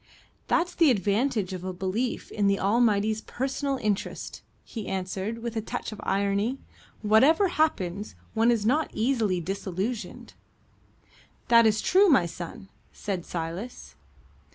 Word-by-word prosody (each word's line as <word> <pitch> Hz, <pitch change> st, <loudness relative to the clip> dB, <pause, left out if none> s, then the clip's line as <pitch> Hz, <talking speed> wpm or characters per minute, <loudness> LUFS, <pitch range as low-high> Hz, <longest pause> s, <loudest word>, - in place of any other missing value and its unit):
"That's 355 Hz, +1 st, +1 dB
the 330 Hz, -4 st, +4 dB
advantage 210 Hz, -1 st, +1 dB
of 180 Hz, -1 st, -6 dB
a 185 Hz, -, -3 dB
belief 190 Hz, +7 st, -3 dB
in 205 Hz, -2 st, +1 dB
the 200 Hz, 0 st, +2 dB
Almighty's 215 Hz, 0 st, +2 dB
personal 270 Hz, +3 st, -2 dB
interest," 210 Hz, -5 st, -3 dB, 0.2 s
he 220 Hz, -4 st, -7 dB
answered, 190 Hz, +4 st, -3 dB
with 235 Hz, -1 st, -4 dB
a 220 Hz, -, 0 dB
touch 215 Hz, -, -5 dB
of 215 Hz, -, -8 dB
irony: 200 Hz, +5 st, 0 dB, 0.5 s
"whatever 275 Hz, -, +5 dB
happens, 205 Hz, -, -1 dB, 0.2 s
one 225 Hz, +1 st, +3 dB
is 230 Hz, -3 st, +2 dB
not 295 Hz, +7 st, +2 dB
easily 220 Hz, -6 st, +1 dB
disillusioned." 195 Hz, +5 st, -4 dB, 1.2 s
"That 230 Hz, -1 st, +7 dB
is 215 Hz, 0 st, +2 dB
true, 390 Hz, +2 st, +5 dB
my 230 Hz, -, +5 dB
son," 175 Hz, +5 st, -8 dB, 0.2 s
said 190 Hz, -5 st, -4 dB
Silas. 170 Hz, +8 st, -5 dB
215 Hz, 130 wpm, -27 LUFS, 195-245 Hz, 1.2 s, That